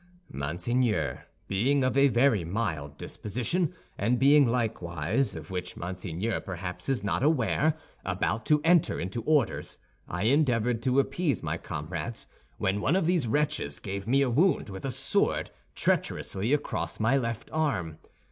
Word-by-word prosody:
"Monseigneur, 85 - -1 0.2
being 130 +8 +2
of 130 -1 +1
a 140 +1 +6
very 120 -5 +3
mild 80 -6 -3
disposition, 125 - -2 0.3
and 115 +5 +2
being, 140 +1 +6
likewise, 110 - -1
of 80 +2 -8
which 90 -1 -5
Monseigneur 90 +4 -3
perhaps 90 0 -6
is 130 -6 0
not 100 - 0
aware, 150 +2 +2 0.3
about 100 +4 -1
to 150 -1 +4
enter 170 -1 +3
into 95 +6 -3
orders, 145 -1 0 0.3
I 90 +2 -3
endeavored 120 -3 +2
to 130 +1 +3
appease 140 - 0
my - - -1
comrades, 85 +8 -5 0.3
when 100 +2 0
one 150 - +2
of 190 - +2
these 170 -7 +2
wretches 115 - 0
gave 100 0 -5
me 135 +3 +4
a 135 - +1
wound 160 - +2
with 95 +4 -7
a - - -1
sword, - - 0 0.2
treacherously, 100 +6 0
across 150 - -1
my 115 +5 +3
left 115 -4 -2
arm. 95 - -1
115 Hz, 145 wpm, -28 LUFS, 95-140 Hz, 0.3 s, a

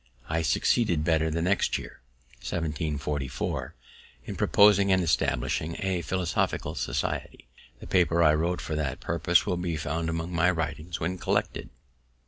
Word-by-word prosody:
I 80 +1 0
succeeded 80 - +2
better 80 0 +2
the 85 +1 -1
next 95 +3 +1
year, - - -10 0.4
1744, 75 -4 -3 0.5
in - - -5
proposing 100 -1 +5
and 95 -1 +3
establishing 80 0 0
a 95 -2 -1
Philosophical 90 -2 -1
Society. - - -3 0.3
The - - -10
paper 85 -2 +3
I 75 -1 +6
wrote 85 +3 0
for - - -5
that 75 -4 -2
purpose 85 +1 +2
will 90 -4 -1
be 85 -2 -2
found 80 +2 -2
among 80 +2 -3
my 85 +1 +3
writings, 80 0 -3
when 90 +3 -2
collected. - - -1
85 Hz, 140 wpm, -27 LUFS, 75-90 Hz, 0.5 s, I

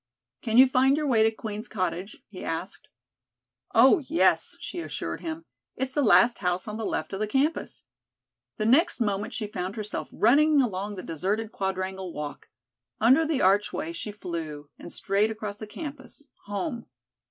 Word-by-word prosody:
"Can 225 0 0
you 260 - +10
find 265 +2 +3
your 305 - -1
way 240 -6 +3
to 220 - +5
Queen's 220 0 -6
Cottage?" 185 0 -4
he 195 - -9
asked. 165 - -5 0.9
"Oh, 260 - +7
yes," 325 +3 +2
she 355 - -6
assured 340 - -5
him. 325 0 -5 0.3
"It's 265 0 -2
the 290 - 0
last 240 -1 +5
house 180 +1 -1
on 210 0 -4
the 225 - -3
left 155 +4 -3
of 195 - -3
the 215 - 0
campus." 275 +8 -1 0.7
The 215 - -1
next 265 +9 +4
moment 205 -1 -1
she 220 - -2
found 190 -2 -4
herself 210 -2 -4
running 295 +6 +4
along 205 -4 -1
the 185 - -7
deserted 205 +7 -2
Quadrangle 190 -1 -3
walk. 150 -1 -7 0.5
Under 265 +8 +5
the 305 -4 0
archway 190 -3 +2
she 190 +5 -5
flew, 160 -7 -6
and 175 - -9
straight 200 +2 +1
across 215 -2 -5
the 215 - -8
campus 290 +2 -9 0.2
home. 235 - -4
215 Hz, 165 wpm, -27 LUFS, 190-260 Hz, 0.9 s, you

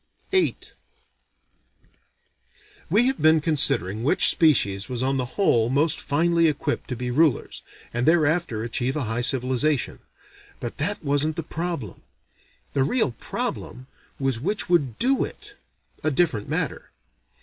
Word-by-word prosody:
VIII 380 -2 +2 2.3
We 225 +4 +4
have 265 0 0
been 155 0 +5
considering 135 - +2
which 145 +9 +4
species 105 - +2
was 125 -1 -3
on 135 +1 0
the 125 -1 -2
whole 120 - +3
most 145 +4 +1
finely 165 +3 +2
equipped 145 -1 -2
to 125 - -3
be 125 +1 -4
rulers, 150 -1 +1 0.3
and 120 +3 -1
thereafter 155 -8 +2
achieve 120 +3 -2
a 150 - -1
high 115 +1 -2
civilization; 130 +2 +1 0.6
but 120 - -6
that 190 +7 -1
wasn't 145 +2 +1
the 165 - -3
problem. 165 - -5 0.7
The 140 - +1
real 225 - +1
problem 125 +2 -5 0.3
was 135 -4 -1
which 200 - -2
would 145 -10 +1
do 270 +2 +2
it: - - -8 0.5
a 155 - +2
different 140 -8 0
matter. - - -3
145 Hz, 135 wpm, -24 LUFS, 125-165 Hz, 2.3 s, been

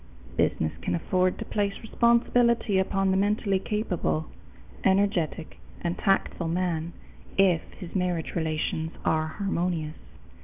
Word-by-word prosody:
Business 80 - +1
can - - -1
afford 185 +2 +1
to - - -5
place 200 -1 -1
responsibility 235 -2 +3
upon 195 0 +1
the 190 - +2
mentally 200 -1 +2
capable, 185 -6 -1 0.6
energetic, 190 -5 +1 0.2
and 170 0 -1
tactful 195 -3 +1
man 170 -1 -1 0.4
if 185 -4 +5 0.2
his 180 -3 -8
marriage 180 -3 -1
relations 160 0 -1
are 155 0 +2
harmonious. 170 -3 -2
185 Hz, 115 wpm, -27 LUFS, 165-200 Hz, 0.6 s, if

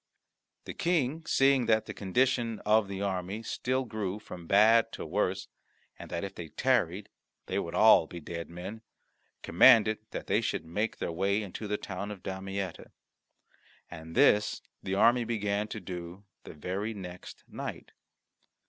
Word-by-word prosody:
The - - -6
King, 160 -2 0
seeing 135 -2 +3
that 110 -1 +3
the - - -6
condition 115 +3 0
of 105 0 +4
the 100 0 -4
army 95 +2 -3
still 130 +3 -1
grew 105 -4 -3
from 90 -5 -10
bad 110 +4 +5
to - - -6
worse, 95 +2 -1 0.5
and - - -9
that 85 - -3
if 100 -1 -5
they 85 -3 -7
tarried 105 -7 +1 0.4
they - - -1
would 85 0 -4
all 110 -5 +6
be 85 - -8
dead 85 +1 -6
men, 90 +6 -7 0.6
commanded 110 +3 +6
that - - -6
they - - +1
should - - -2
make 105 +7 -2
their - - -3
way 100 +5 0
into 105 +2 -6
the 105 0 -1
town 100 +1 -6
of 100 -3 -8
Damietta. 95 -1 -5 1.0
And 80 +1 -9
this 105 0 +3 0.2
the 95 - -2
army 120 +4 +4
began 105 -2 -1
to 110 - -6
do 90 0 -8 0.2
the - - -10
very 100 +8 -3
next 90 -2 -9
night. - - -7
100 Hz, 155 wpm, -30 LUFS, 90-110 Hz, 1.0 s, all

